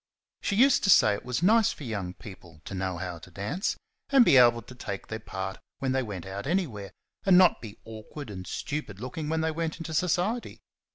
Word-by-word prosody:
She 200 - -1
used 265 +5 +5
to - - +2
say 110 - +7
it 100 - -5
was 125 +5 -2
nice 220 +3 +5
for - - -9
young 100 -7 -4
people 85 -6 -12
to - - -7
know 95 -1 -2
how 90 -1 -5
to 85 - -13
dance, 105 - -3 0.3
and 270 -3 +6
be - - +6
able 120 -2 +6
to 125 - -12
take 100 -6 -6
their 110 - -4
part 95 -2 -5 0.2
when 135 -1 -1
they 130 0 +1
went 100 -7 -6
out 100 +4 -6
anywhere, 140 - -2 0.3
and 190 -3 +6
not 185 -1 +5
be 110 -2 -9
awkward 110 +4 -9
and 95 -2 -8
stupid 140 -10 -4
looking 140 +6 -5
when 160 0 0
they 160 0 0
went 160 0 -3
into 165 -1 -6
society. 180 +8 0
125 Hz, 215 wpm, -28 LUFS, 100-165 Hz, 0.3 s, say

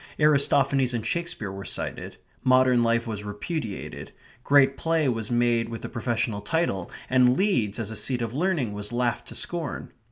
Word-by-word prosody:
Aristophanes 140 -3 +3
and 115 -2 -3
Shakespeare 170 - -2
were 95 0 -7
cited. - - -5 0.3
Modern 130 -1 +4
life 115 0 +2
was 110 -3 -5
repudiated. 105 - -5 0.3
Great 140 -1 +5
play 160 0 +1
was 115 -4 -1
made 120 -1 +2
with 115 -1 -7
the - - -5
professional 115 -3 -2
title, 100 - -1 0.2
and 125 0 +4
Leeds 120 - +1
as 110 -2 -3
a - - -5
seat 120 +3 0
of 115 0 -4
learning 150 - 0
was 105 +1 -5
laughed 120 -1 -1
to - - -8
scorn. 170 -4 -4
120 Hz, 165 wpm, -26 LUFS, 110-140 Hz, 0.3 s, Great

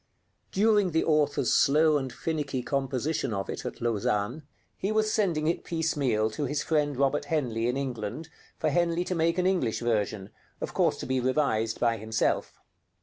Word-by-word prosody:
During 205 -3 +3
the 160 - +2
author's 150 -2 +2
slow 150 +1 +4
and 130 -2 -5
finicky 145 -5 -3
composition 135 -2 -1
of 95 0 -3
it - - -5
at - - -8
Lausanne, 115 +3 0 0.3
he 195 - -2
was 215 0 +1
sending 175 -8 +1
it 165 +2 0
piecemeal 140 -10 0
to 145 +7 -3
his 145 +2 -1
friend 145 -4 0
Robert 140 +2 +1
Henley 125 -7 -1
in 125 +2 0
England 130 +2 -4 0.3
for 155 - 0
Henley 170 +1 +1
to 185 - -3
make 165 0 +1
an 180 - +1
English 180 - +1
version, 105 -4 -1 0.3
of - - -5
course - - +2
to - - -5
be 130 0 0
revised 125 -4 0
by 115 -1 +2
himself. 110 +1 -1
145 Hz, 170 wpm, -28 LUFS, 120-160 Hz, 0.3 s, slow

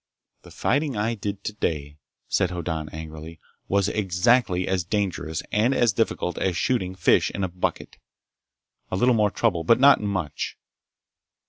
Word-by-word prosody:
"The - - -15
fighting 140 -2 0
I 110 +3 0
did 100 -2 -5
today," 75 -8 -3 0.3
said 95 - +1
Hoddan 80 -3 -4
angrily, 80 +1 -9 0.3
"was 100 0 +2
exactly 95 -1 +2
as 95 -2 0
dangerous 90 -5 -2
and 115 +6 +2
as 120 -5 +3
difficult 90 -5 -1
as 90 -3 0
shooting 95 -7 0
fish 95 - +3
in 100 - -4
a - - +1
bucket. 90 0 -4 0.9
A - - -2
little 125 +6 +3
more 105 -2 +3
trouble, 85 -3 0
but 115 +9 +4
not 140 +1 +6
much." 95 -8 -3
95 Hz, 145 wpm, -24 LUFS, 85-110 Hz, 0.9 s, not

